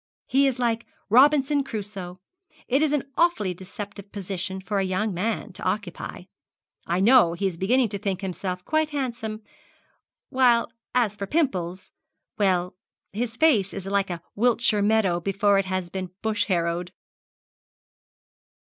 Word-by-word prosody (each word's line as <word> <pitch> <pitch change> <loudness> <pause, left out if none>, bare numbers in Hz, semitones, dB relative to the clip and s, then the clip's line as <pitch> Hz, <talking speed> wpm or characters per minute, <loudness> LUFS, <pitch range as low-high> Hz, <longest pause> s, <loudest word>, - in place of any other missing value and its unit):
He 275 +1 +3
is 265 -2 0
like 235 -2 -1 0.2
Robinson 280 +3 +5
Crusoe. 200 -6 -6 0.5
It 270 +3 +2
is 310 -2 +2
an 295 -2 +1
awfully 220 - +2
deceptive 200 +2 -9
position 190 -1 -4
for 200 +1 -2
a - - +1
young 190 +3 -1
man 205 +3 -2
to - - -4
occupy. 185 -2 -3 0.6
I 175 +2 +1
know 215 -4 +6
he 195 +4 -3
is 190 -3 0
beginning 230 +7 +2
to 200 0 -4
think 195 -2 -2
himself 185 -1 -4
quite 310 0 +1
handsome, 235 -6 -4 0.9
while 240 -3 +3 0.2
as 230 -5 +2
for 200 -1 -5
pimples 185 - -1 0.4
well, 185 -3 +1 0.4
his 230 +2 -3
face 235 - +3
is 195 -1 -6
like 195 0 0
a 175 -1 -5
Wiltshire 235 -1 +2
meadow 205 -4 +2
before 195 +2 +2
it 195 - 0
has 185 -2 -3
been 185 -1 -4
bush 220 -1 +1
harrowed.' 170 -1 -1
205 Hz, 145 wpm, -25 LUFS, 185-240 Hz, 0.9 s, know